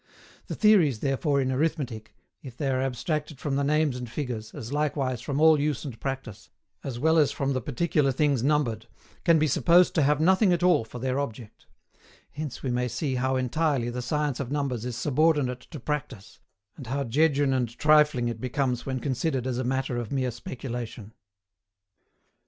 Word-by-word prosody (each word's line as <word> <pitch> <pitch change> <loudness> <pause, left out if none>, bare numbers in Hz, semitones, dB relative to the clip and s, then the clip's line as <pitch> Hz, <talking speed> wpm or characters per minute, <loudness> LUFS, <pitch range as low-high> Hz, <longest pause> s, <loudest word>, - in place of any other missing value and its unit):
The - - -4
theories 175 - +4
therefore 140 +1 +1
in 130 -1 0
Arithmetic, 130 -6 -2 0.3
if 130 -3 -11
they 140 -3 -1
are 130 0 0
abstracted 135 +3 -3
from 140 -2 -2
the 140 - +1
names 150 -1 +1
and 125 -2 -6
figures, 115 -5 -5
as 135 -3 -7
likewise 140 -5 -1
from 140 +2 -3
all 160 -1 +6
use 150 -1 -1
and 125 -6 -7
practice, 135 -6 -6 0.3
as 130 -4 -5
well 160 +5 +3
as 145 -2 +3
from 140 -1 -1
the 130 - -1
particular 145 +2 0
things 140 -2 +1
numbered, 125 -5 0 0.4
can 170 -2 +5
be 155 - +2
supposed 175 +5 +4
to 160 - +2
have 145 +1 +3
nothing 190 +4 +4
at 175 0 -1
all 180 -9 +4
for 110 - -10
their 130 +2 -1
object; 115 -5 -7 0.6
hence 145 -3 -6
we 130 - -1
may 125 0 0
see 135 +3 -2
how 130 +1 0
entirely 130 -1 0
the 125 +1 -4
science 145 +1 -1
of 135 -2 -4
numbers 135 -5 -2
is 125 -2 -4
subordinate 145 -2 +1
to 155 - -8
practice, 125 -6 -5 0.4
and 135 -6 -10
how 140 +3 -1
jejune 140 +2 +2
and 120 -2 -2
trifling 150 -5 +4
it 120 - -4
becomes 125 0 -1
when 130 -1 -2
considered 130 0 -1
as 125 -1 -2
a - - -1
matter 130 0 -1
of 120 -3 -4
mere 130 -2 0
speculation. 120 -3 -7
135 Hz, 185 wpm, -26 LUFS, 125-150 Hz, 0.6 s, all